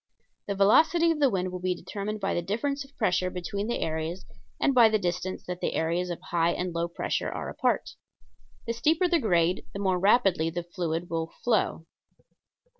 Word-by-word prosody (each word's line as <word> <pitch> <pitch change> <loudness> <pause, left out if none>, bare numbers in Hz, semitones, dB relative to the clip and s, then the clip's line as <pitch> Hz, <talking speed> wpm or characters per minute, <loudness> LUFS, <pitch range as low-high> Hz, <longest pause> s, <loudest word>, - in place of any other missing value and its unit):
The 200 - -2
velocity 320 - +5
of 320 - -2
the 280 -2 +4
wind 185 -4 -1
will 180 - -5
be 180 0 -1
determined 210 +4 -5
by 195 -1 -1
the 175 - 0
difference 275 +10 -2
of 275 +1 -20
pressure 185 -4 +1
between 190 +3 -4
the 235 - -2
areas 160 +3 -3 0.3
and 275 - +2
by 235 -3 +7
the 215 - +2
distance 180 -1 -3
that 180 0 -5
the - - -1
areas 170 +3 0
of 175 - -4
high 170 0 +2
and 180 -1 -3
low 170 0 -1
pressure 170 - -2
are - - -5
apart. - - 0 0.7
The 230 - -1
steeper 315 +9 +2
the 340 -1 +2
grade 180 - +2
the 200 - -5
more 190 -2 +1
rapidly 195 -5 +3
the 175 +1 -4
fluid 170 -1 -3
will 165 0 -2
flow. 220 -8 +1
185 Hz, 190 wpm, -27 LUFS, 175-225 Hz, 0.7 s, by